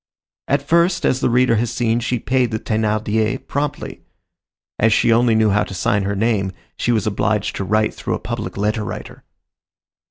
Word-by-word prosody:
At 140 0 +1
first, 170 +3 +2
as 130 - +2
the - - +1
reader 120 -1 +3
has 115 +1 0
seen, 115 -1 0
she 125 +1 -1
paid 125 +1 0
the 110 - -2
Thénardiers 110 0 -1
promptly. 145 +1 -3 0.8
As 110 +1 +4
she 115 +2 +4
only 115 0 +3
knew 110 -1 +3
how 105 +1 +2
to 95 - -7
sign 105 0 0
her 100 +1 -1
name, 100 -3 0 0.2
she 120 - 0
was 110 -4 +1
obliged 105 0 0
to - - -2
write 110 +3 +1
through - - -3
a - - -5
public - - -5
letter 105 +2 0
writer. - - -8
110 Hz, 185 wpm, -19 LUFS, 105-120 Hz, 0.8 s, As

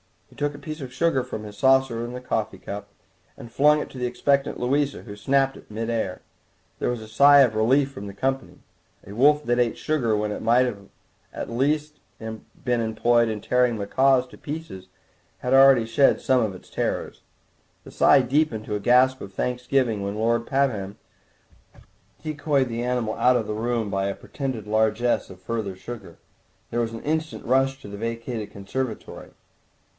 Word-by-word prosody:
He - - -18
took 145 0 -2
a - - -10
piece 155 +1 -7
of 130 -2 -7
sugar 135 -1 +1
from 110 - -6
the 105 -1 -9
saucer 130 +1 +2
of 120 - -5
his 125 0 -7
coffee 110 -5 -2
cup 100 +2 -7 0.5
and 115 - -11
flung 150 +4 +4
it - - -5
to 130 - -9
the 125 - 0
expectant 140 +2 0
Louisa, 140 +3 0
who 100 -3 -9
snapped 135 +5 +1
it - - -15
in 105 - -11
mid 115 +1 -2
air. 110 -5 -2 0.6
There - - 0
was 120 -2 -3
a - - -11
sigh 140 +6 +7
of 125 -5 +4
relief 130 +6 +2
from 100 -7 -8
the 100 - -8
company; 135 +5 -3 0.4
a 100 - -10
wolf 150 +6 +4
that 120 -1 +1
ate 120 -2 +1
sugar 125 -9 0
when 105 0 -1
it - - -5
might 120 +3 +4
at 100 -5 -9
the - - -8
least 150 +4 0 0.2
have 110 -1 -6 0.2
been 120 -2 +1
employed 115 +1 +2
in 110 -1 -4
tearing 125 -1 +2
macaws 130 +5 +2
to - - -14
pieces 145 - -7 0.5
had 125 - -1
already 135 -3 +7
shed 115 +5 +3
some 130 -2 +2
of 105 -4 -1
its - - -15
terrors. - - -3 0.6
The - - -12
sigh - - +5
deepened 125 -4 0
to 105 - -3
a - - -2
gasp 130 +4 +4
of 100 - -9
thanks 125 +4 -3
giving 125 -7 +1
when 100 +1 -3
Lord 115 +2 0
Pabham 110 -8 -1 1.3
decoyed 145 -4 0
the 115 0 -3
animal 125 -3 -1
out 125 0 +4
of 115 -3 0
the 105 - -3
room 115 -1 -2
by 95 0 0
a 100 - -3
pretended 130 -7 -5
largesse 110 +2 +1
of 95 -1 -12
further 105 -2 -3
sugar. 100 -3 -9 0.5
There 120 - -1
was 115 -1 -1
an 115 - -8
instant 155 +1 -2
rush 135 +2 +2
to - - -10
the 100 0 -8
vacated 115 -1 -4
conservatory. 110 +5 -5
120 Hz, 190 wpm, -24 LUFS, 110-135 Hz, 1.3 s, sigh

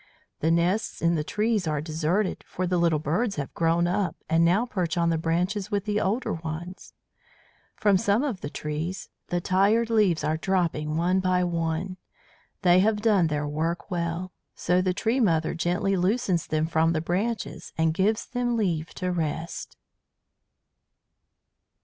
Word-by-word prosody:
"The 160 - +1
nests 170 +6 +1
in 170 0 +2
the 155 -3 0
trees 210 +1 0
are 150 -1 0
deserted, 165 +6 -1
for 185 - -3
the 180 0 +1
little 170 -2 +3
birds 175 +9 -1
have 140 -2 -5
grown 170 +1 +2
up 180 -1 0
and 165 +1 +3
now 185 +8 +3
perch 180 -8 -2
on 170 -1 +2
the 165 - +1
branches 180 +5 -1
with 205 -2 -1
the 210 -1 0
older 220 +7 0
ones. 165 +4 -7 0.8
From 200 -3 +3
some 205 +4 +2
of 245 -11 -3
the 145 - -4
trees 155 +6 -4 0.2
the 175 - 0
tired 205 +6 +2
leaves 205 -7 +3
are 155 - 0
dropping 160 -4 0
one 180 +3 +2
by 185 -1 +2
one. 170 +1 -2 0.7
They 180 0 +6
have 210 +2 +2
done 200 -7 +4
their 150 -1 -2
work 165 +6 -2
well, 170 +1 -2 0.2
so 180 +1 +1
the 185 0 +1
tree 230 +6 0
mother 165 -9 +2
gently 175 +3 0
loosens 185 -1 +1
them 155 0 0
from 160 0 +2
the 155 - 0
branches 200 +8 -3
and 160 0 +2
gives 205 +5 +1
them 245 -2 -1
leave 165 -7 -1
to 180 -1 -2
rest." 165 -1 -4
175 Hz, 160 wpm, -26 LUFS, 165-200 Hz, 0.8 s, They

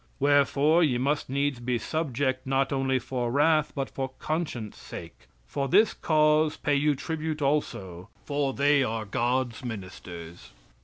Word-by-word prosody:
Wherefore, 145 +3 +4
ye 130 -6 +2
must 140 +3 0
needs 140 -1 0
be 120 0 -1
subject 130 -2 -2
not 135 +1 +1
only 135 -1 +1
for 125 -1 -3
wrath 150 +2 +3
but 135 -2 -2
for 135 -1 -4
conscience 150 -10 -3
sake. 70 -7 -10 0.2
"For 140 - -2
this 210 +8 +4
cause 155 -1 +2
pay 145 - 0
you 145 +1 +2
tribute 155 +2 -3
also, 95 - -2 0.2
for 145 -2 0
they 140 +1 +3
are 110 -3 -1
God's 120 +2 -1
ministers." 95 -6 -8
135 Hz, 145 wpm, -27 LUFS, 120-150 Hz, 0.2 s, Wherefore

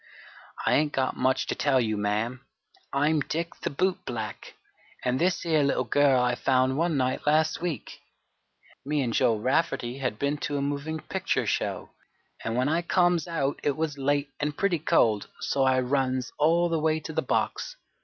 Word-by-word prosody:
"I - - +3
ain't 150 0 +2
got 130 -1 0
much 130 +1 +1
to - - -2
tell 140 -3 +2
you, 110 -3 0
ma'am. 105 +5 -1 0.5
I'm 150 +3 +2
Dick 165 +3 -3
the - - -1
boot 185 +6 -1
black, - - -6 0.5
an' 125 +1 +1
this 180 +1 +1
here 160 -3 +2
little 140 -2 +1
girl 135 +2 +3
I 125 0 +2
found 130 +1 +2
one 165 0 +1
night 130 +2 -1
last 155 +2 +2
week. 170 -5 -4 0.8
Me 145 0 0
and 120 -2 -2
Joe 115 - +3
Rafferty 130 0 0
had 125 -6 -2
been 140 +3 0
to 145 0 -2
a - - 0
movin' 145 +3 -3
picture 190 0 -1
show, - - -2 0.5
and 115 - -2
when 125 +2 +1
I 160 +3 +1
comes 175 -2 +2
out 150 -5 -1
it 145 -1 0
was 155 -3 -2
late 145 +1 0
an' 150 0 -1
pretty 180 +1 0
cold, 115 -10 +2
so 135 -1 +1
I 130 0 +3
runs 130 -1 0
all 165 +3 +4
the 165 -1 0
way 155 0 +1
to 155 - -7
the - - +1
box. - - -1
145 Hz, 185 wpm, -27 LUFS, 130-160 Hz, 0.8 s, all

